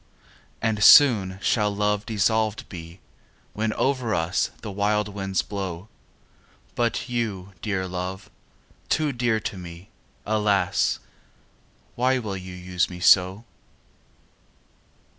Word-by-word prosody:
And 110 Hz, -2 st, +1 dB
soon 105 Hz, -10 st, +7 dB
shall 105 Hz, -3 st, +2 dB
love 105 Hz, +1 st, 0 dB
dissolved 110 Hz, 0 st, 0 dB
be 85 Hz, 0 st, -10 dB, 0.5 s
When 110 Hz, +1 st, -1 dB
over 130 Hz, -5 st, 0 dB
us 85 Hz, +3 st, 0 dB
the 105 Hz, -, -5 dB
wild 105 Hz, +1 st, 0 dB
winds 95 Hz, -2 st, -2 dB
blowâ 95 Hz, -1 st, -6 dB, 0.8 s
But 120 Hz, 0 st, -1 dB
you, 105 Hz, -6 st, -3 dB
dear 95 Hz, -3 st, -2 dB
love, 90 Hz, +1 st, -5 dB, 0.6 s
too 155 Hz, -2 st, +1 dB
dear 120 Hz, -3 st, 0 dB
to 95 Hz, -, -5 dB
me, 85 Hz, +1 st, -11 dB, 0.4 s
Alas! 105 Hz, -3 st, +1 dB, 1.0 s
why 130 Hz, +2 st, +1 dB
will 105 Hz, -6 st, -4 dB
you 95 Hz, -1 st, -8 dB
use 90 Hz, -1 st, -1 dB
me 90 Hz, -1 st, -8 dB
so? 95 Hz, +4 st, +4 dB
100 Hz, 110 wpm, -24 LUFS, 95-110 Hz, 1.0 s, soon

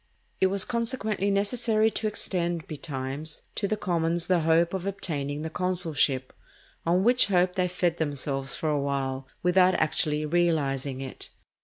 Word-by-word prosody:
It 190 Hz, -, +4 dB
was 195 Hz, 0 st, +1 dB
consequently 225 Hz, -4 st, -1 dB
necessary 220 Hz, +2 st, +2 dB
to 215 Hz, -, -1 dB
extend, 175 Hz, -5 st, -2 dB
betimes, 140 Hz, +1 st, -5 dB
to 200 Hz, -, -1 dB
the 215 Hz, -, -1 dB
commons 170 Hz, -3 st, 0 dB
the 180 Hz, -2 st, +3 dB
hope 165 Hz, +2 st, +3 dB
of 190 Hz, 0 st, -3 dB
obtaining 150 Hz, -7 st, -3 dB
the 160 Hz, -, -4 dB
consulship, 165 Hz, -8 st, 0 dB, 0.5 s
on 180 Hz, +3 st, +3 dB
which 245 Hz, +1 st, +4 dB
hope 180 Hz, -2 st, +2 dB
they 180 Hz, -1 st, +1 dB
fed 175 Hz, -1 st, 0 dB
themselves 140 Hz, -3 st, -1 dB
for 155 Hz, -, -2 dB
a 145 Hz, -1 st, +1 dB
while, 135 Hz, -1 st, -2 dB, 0.2 s
without 180 Hz, +1 st, +4 dB
actually 155 Hz, -1 st, +1 dB
realizing 145 Hz, -5 st, 0 dB
it. 135 Hz, -1 st, -7 dB
170 Hz, 150 wpm, -27 LUFS, 145-190 Hz, 0.5 s, It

